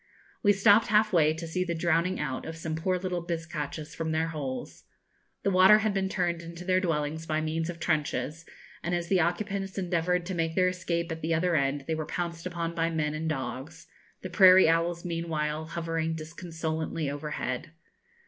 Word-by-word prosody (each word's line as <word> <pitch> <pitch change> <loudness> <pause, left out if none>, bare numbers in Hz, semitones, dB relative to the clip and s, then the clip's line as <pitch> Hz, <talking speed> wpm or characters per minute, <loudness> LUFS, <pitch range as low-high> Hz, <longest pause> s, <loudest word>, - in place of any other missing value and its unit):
We 205 - +5
stopped 205 +2 +5
half 215 0 +3
way 155 -3 +5
to 165 +1 -6
see 180 +3 -1
the 170 -2 -2
drowning 170 +2 +1
out 135 -3 -3
of 160 0 -6
some 160 -1 -3
poor 185 +3 0
little 180 -1 -2
bizcachas 160 -3 -4
from 160 -1 -2
their 160 +1 0
holes. 140 -5 -5 0.6
The 200 - +2
water 190 +3 +7
had 215 - +2
been 190 -1 0
turned 175 -3 -1
into 170 +1 -9
their 185 0 +3
dwellings 160 -2 -2
by 155 0 0
means 160 +1 -2
of 170 -1 -6
trenches, 155 0 -1 0.4
and 175 +1 -1
as 170 -1 -3
the 190 - +4
occupants 195 +3 -1
endeavoured 180 -1 0
to 190 - -4
make 165 -1 -1
their 185 -1 +4
escape 170 -2 -2
at 160 0 -5
the 165 +1 +1
other 175 +1 +1
end 140 -1 0
they 160 - 0
were 155 -1 -3
pounced 170 0 -3
upon 170 -1 -3
by 165 -1 0
men 155 -2 -1
and 160 +1 -2
dogs; 135 +3 -5 0.4
the 185 - -4
prairie 185 -1 +8
owls 170 +1 +1
meanwhile 160 -2 -2
hovering 165 -1 -2
disconsolately 160 -1 -4
overhead. 145 0 -4
165 Hz, 185 wpm, -28 LUFS, 160-180 Hz, 0.6 s, prairie